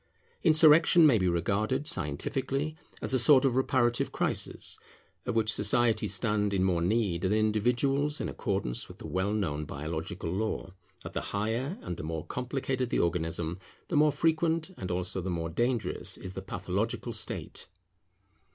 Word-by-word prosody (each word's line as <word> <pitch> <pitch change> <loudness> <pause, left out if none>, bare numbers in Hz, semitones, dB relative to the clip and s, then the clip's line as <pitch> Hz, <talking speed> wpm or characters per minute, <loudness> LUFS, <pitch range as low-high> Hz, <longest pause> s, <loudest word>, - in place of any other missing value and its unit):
Insurrection 160 +1 +7
may 130 -8 +5
be 90 - +1
regarded, 105 - 0
scientifically, 135 - -1 0.3
as - - +1
a 130 - +3
sort 135 +2 +6
of 130 -3 +2
reparative 120 -2 +1
crisis, - - -1 0.5
of - - -1
which 110 -1 +2
societies 110 0 +2
stand 105 0 0
in 95 - +2
more 90 -3 +1
need 95 -2 +1
than 95 +2 +1
individuals 125 +7 +1
in - - -2
accordance 95 -12 -2
with - - -12
the - - -10
well 95 +2 -1
known 85 -9 -1
biological 80 +4 -5
law, 100 -1 -3 0.3
that - - -8
the - - -2 0.2
higher 115 - -2
and 90 -1 -5
the - - -6
more 80 0 -4
complicated 130 0 -2
the - - 0
organism, 85 0 -1 0.3
the 175 - -1
more 150 0 +5
frequent 160 +3 +1
and 90 - -6
also 90 +1 -2
the 95 - -4
more 85 -2 -2
dangerous 120 +6 -1
is 95 - -8
the 95 - -6
pathological 95 +6 -3
state. 110 - -4
110 Hz, 160 wpm, -29 LUFS, 90-130 Hz, 0.5 s, Insurrection